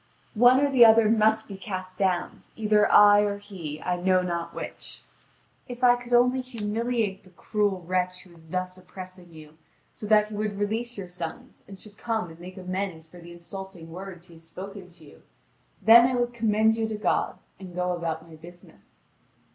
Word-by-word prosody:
One 245 +3 +6
or 285 0 +1
the 255 -3 +7
other 225 -1 +7
must 220 0 +2
be 195 - -8
cast 185 -2 -6
down, 185 -2 -1
either 210 -1 +2
I 205 0 +7
or 205 -1 0
he, 180 -7 -8
I 180 0 -1
know 185 0 +3
not 170 -1 -3
which. - - -8 0.6
If 245 -1 -8
I 245 -1 +7
could 245 0 -11
only 250 +2 +4
humiliate 230 -3 -3
the 185 - -18
cruel 200 0 -2
wretch 180 +1 -2
who 180 - -19
is 170 -1 -17
thus 185 +3 -5
oppressing 185 -1 -11
you, 155 -1 -15 0.3
so 210 - -8
that 210 0 +4
he - - -9
would 210 -1 -3
release 225 +4 -3
your 195 -2 -6
sons 180 +8 -8
and 195 -1 -11
should 210 +1 -15
come 220 -7 -2
and 160 - -15
make 185 +2 -11
amends 185 -3 -4
for 175 - -14
the 170 0 -12
insulting 175 -1 -10
words 180 0 -9
he 175 - -17
has 165 0 -15
spoken 190 +3 -10
to 170 -2 -18
you, 145 - -17 0.6
then 235 +2 +8
I 255 - -1
would 240 0 -1
commend 220 -1 +2
you 225 -1 -1
to 220 - -4
God 210 - 0 0.2
and 185 -2 -10
go 180 0 -1
about 165 -1 -4
my 160 -1 -13
business." 165 - -17
195 Hz, 195 wpm, -26 LUFS, 175-220 Hz, 0.6 s, then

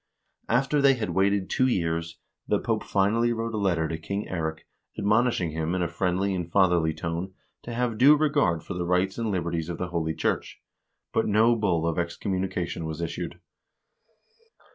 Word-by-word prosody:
After 135 +5 +2
they 140 -1 +5
had 110 -7 -3
waited 95 +2 +2
two 130 - +2
years, 85 -6 -1 0.3
the - - +2
Pope - - -1
finally 110 +5 +2
wrote 115 0 -2
a 110 - -1
letter 85 -5 +1
to 80 +1 -4
King 100 +5 -3
Eirik, 80 -3 -3 0.3
admonishing 105 -4 +2
him 80 +3 -2
in 90 - 0
a - - 0
friendly 90 +3 0
and 85 -2 -4
fatherly 85 -4 +3
tone 85 +4 -4 0.3
to 120 - -8
have 120 -2 -1
due 140 +4 +8
regard 145 - +1
for - - -6
the 90 -1 -3
rights 90 +4 +1
and 115 -1 -1
liberties 85 -3 -2
of 85 - -4
the 90 - -3
holy 80 -2 -2
church; - - -2 0.5
but 110 - +1
no 110 +3 +4
bull 90 -7 +1
of 85 0 0
excommunication 90 -1 -2
was 80 0 -5
issued. 85 -1 -4
95 Hz, 175 wpm, -26 LUFS, 85-110 Hz, 0.5 s, due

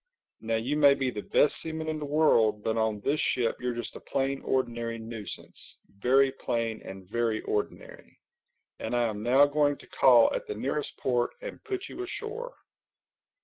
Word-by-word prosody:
Now 115 0 -1
you 125 +7 -1
may 140 -2 +6
be 135 -2 -1
the 105 - -5
best 145 - +2
seaman 160 0 -4
in 155 -1 -2
the 150 - -4
world, 115 -9 +3
but 110 - 0
on 110 -2 0
this 145 +7 0
ship 120 -3 +1
you're 125 -1 -2
just 120 - -6
a - - -7
plain 135 0 -2
ordinary 120 -3 -1
nuisance—very 115 +3 -2
plain 115 -2 -2
and 95 -1 -9
very 115 +1 0
ordinary. 105 - -4 0.6
And - - -3
I 120 - +2
am 110 -3 -2
now 130 +5 +5
going 145 0 +2
to - - -15
call 120 -3 +5
at - - -3
the 105 - -4
nearest 140 +6 -3
port 120 -2 0
and - - -8
put 390 -2 -4
you - - -7
ashore." 455 +6 -6
125 Hz, 175 wpm, -28 LUFS, 115-145 Hz, 0.6 s, may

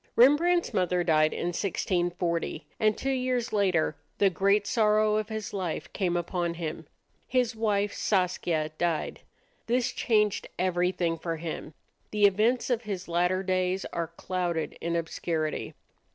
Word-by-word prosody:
Rembrandt's 335 +8 +4
mother 180 -1 +1
died 155 -2 +3
in 175 - -2
1640, 175 -3 -1
and 215 -2 +3
two 270 - -1
years 255 -2 -1
later 185 -7 +2 0.2
the 200 -2 +4
great 200 +4 +2
sorrow 215 -1 +3
of 215 0 -2
his 220 -2 -5
life 185 -5 -3
came 180 -4 0
upon 175 0 -2
him. 160 -2 -5 0.4
His 250 -3 +1
wife 205 -2 0
Saskia 175 -5 0
died. 170 -2 -1 0.5
This 240 +1 +1
changed 210 -3 +1
everything 180 -2 0
for 165 0 -3
him. 160 -1 -6 0.3
The 210 -1 +3
events 220 +6 +2
of 240 -2 +1
his 200 -5 -5
latter 180 +2 +1
days 185 0 0
are 170 -1 -1
clouded 170 -1 -3
in 170 0 -1
obscurity. 160 -1 -2
185 Hz, 140 wpm, -28 LUFS, 170-215 Hz, 0.5 s, Rembrandt's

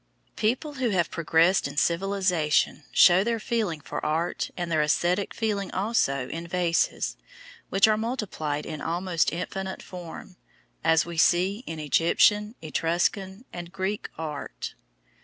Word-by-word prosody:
People 250 +7 0
who 245 - +2
have 175 -5 +1
progressed 165 +2 +3
in 140 +1 -9
civilisation 175 -3 +1
show 180 +2 +6
their 230 +1 0
feeling 215 -8 -1
for - - -6
art 160 +3 -1
and 175 -1 -3
their 155 -1 +3
æsthetic 175 +6 +1
feeling 205 -4 -2
also 185 - 0
in 165 +1 -6
vases 170 -1 0 0.5
which 195 +2 +5
are 215 -1 +3
multiplied 195 - -3
in 155 -3 -6
almost 170 0 0
infinite 190 +2 -4
form, 180 0 -9 0.5
as 160 0 +4
we 170 -1 -7
see 185 +5 +3
in 160 -1 -5
Egyptian, 205 - +3
Etruscan, 185 +7 -1
and 175 -1 -7
Greek 195 +2 -3
art. 150 -3 -5
175 Hz, 135 wpm, -26 LUFS, 165-200 Hz, 0.5 s, show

